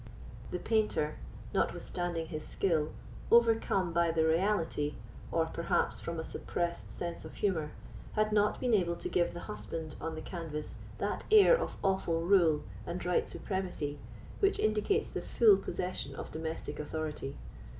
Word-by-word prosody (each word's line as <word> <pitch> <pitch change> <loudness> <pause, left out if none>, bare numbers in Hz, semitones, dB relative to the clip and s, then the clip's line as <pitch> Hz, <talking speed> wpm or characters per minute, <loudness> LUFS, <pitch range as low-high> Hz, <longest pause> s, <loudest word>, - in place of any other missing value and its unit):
The - - -2
painter, 210 -9 +1 0.4
notwithstanding 175 -2 -1
his 155 -2 -4
skill, 160 -5 +1 0.4
overcome 225 -6 +4
by 170 0 +3
the 160 -1 +2
reality, 160 -3 +1 0.4
or, 165 -1 +2
perhaps, 170 +1 0
from 170 -1 -4
a - - -2
suppressed 170 +1 -3
sense 170 -1 -5
of - - -10
humour, 160 -7 0 0.4
had 215 0 +2
not 210 0 +3
been 250 -2 +1
able 175 -5 +3
to - - -5
give 175 -1 +1
the 175 - -5
husband 150 +10 -6
on 160 0 -3
the 155 - -5
canvas 160 -4 -5 0.2
that - - -2
air 435 +3 +8
of 485 - -3
awful 190 -4 +1
rule 170 -5 +4 0.2
and 180 +1 -4
right 180 -1 +2
supremacy 180 -7 -3 0.4
which 395 0 +3
indicates 215 - +1
the - - -3
full 220 -4 +6
possession 180 -7 -3
of - - -7
domestic 160 +1 -4
authority. 150 -2 -4
170 Hz, 150 wpm, -32 LUFS, 160-200 Hz, 0.4 s, air